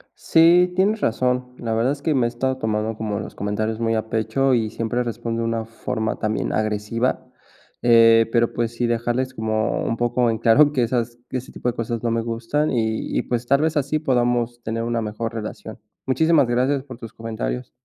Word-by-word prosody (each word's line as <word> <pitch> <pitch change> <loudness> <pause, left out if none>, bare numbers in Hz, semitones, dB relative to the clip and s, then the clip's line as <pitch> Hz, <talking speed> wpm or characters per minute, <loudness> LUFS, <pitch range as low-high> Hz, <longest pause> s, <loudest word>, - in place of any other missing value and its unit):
Sí, 175 +2 +4
tienes 205 +3 +2
razón. 125 +2 0
La 115 -1 -2
verdad 115 +4 +1
es 140 0 -5
que 155 +1 +1
me 125 -3 +2
he - - +1
estado 130 +2 -2
tomando 110 -1 -1
como 105 -2 -3
los - - -8
comentarios 110 +2 -2
muy 115 -1 0
a 110 0 -3
pecho, 135 +4 +1
y 110 -3 +1
siempre 115 +2 -2
respondo 115 -1 -3
de 115 - -1
una 115 -1 -2
forma 110 -1 -3
también 110 0 -2
agresiva, 110 +3 -1 0.6
eh, 115 -1 +6
pero, 120 -1 +2
pues, 120 -1 -2
sí 120 0 0
dejarles 120 +3 -1
como 110 -1 -1
un 115 - -1
poco 120 0 +1
en 110 - -3
claro 145 +7 +5
que 130 - +1
esas 120 0 -1
que 130 - -2
ese 125 - -8
tipo 125 - -2
de 120 - -4
cosas 115 -1 -3
no 115 - +1
me 115 0 +1
gustan 115 +6 -1
y 110 -3 -1
y, - - +2
pues, 120 -1 -2
tal 140 +2 +3
vez 160 0 +1
así 145 +2 0
podamos 120 -3 0
tener 115 +1 -3
una 120 0 -1
mejor 110 +2 -4
relación. 110 0 -7 0.3
Muchísimas 145 0 +3
gracias 130 +3 +1
por 130 -4 -10
tus 115 -3 -10
comentarios. 60 - -4
115 Hz, 205 wpm, -22 LUFS, 110-130 Hz, 0.6 s, eh